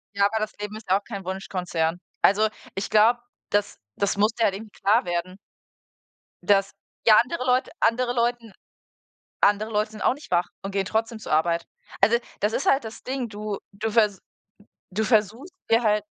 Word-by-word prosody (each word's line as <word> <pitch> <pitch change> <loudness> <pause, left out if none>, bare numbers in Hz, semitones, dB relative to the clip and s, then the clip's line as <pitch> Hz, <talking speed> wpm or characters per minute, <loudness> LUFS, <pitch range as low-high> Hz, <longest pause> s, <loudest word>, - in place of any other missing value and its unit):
Ja, 200 0 +4
aber 220 +2 +1
das 215 0 -3
Leben 210 0 -6
ist 215 -3 -11
ja 190 - +5
auch - - -26
kein 200 -4 -7
Wunschkonzern. 180 -3 -2 0.2
Also, 210 +3 +4 0.3
ich 195 - -3
glaube, 225 +3 +5 0.3
das 205 0 0 0.2
das 200 0 0
muss 210 +2 +3
dir 230 0 +1
halt 195 - +1
eben 215 +2 -8
klar 210 +5 +2
werden. 175 +2 -3 1.1
Das 195 -1 +3 0.4
ja, 215 -1 +9
andere 255 +1 -4
Leute 255 0 +2
andere 245 +2 +2
Leuten 235 -2 -1 0.9
andere 205 +2 +3
Leute 215 0 0
sind 215 - -8
auch - - +3
nicht 290 - -14
wach 175 0 +2 0.2
und 195 0 -5
gehen 195 0 0
trotzdem 225 +3 -1
zur 215 - -6
Arbeit. 170 +2 +2 0.4
Also, 220 +4 +5 0.2
das 210 +2 +1
ist 270 - -2
halt 270 -1 +3
das 220 +1 -8
Ding, 255 -2 -3
du 210 -1 -5
du 215 +3 -3
vers 210 -3 +2 0.7
du 210 +4 -1
versuchst 225 - +1 0.2
dir 230 +1 +5
halt 210 -2 +2
210 Hz, 185 wpm, -25 LUFS, 195-230 Hz, 1.1 s, ja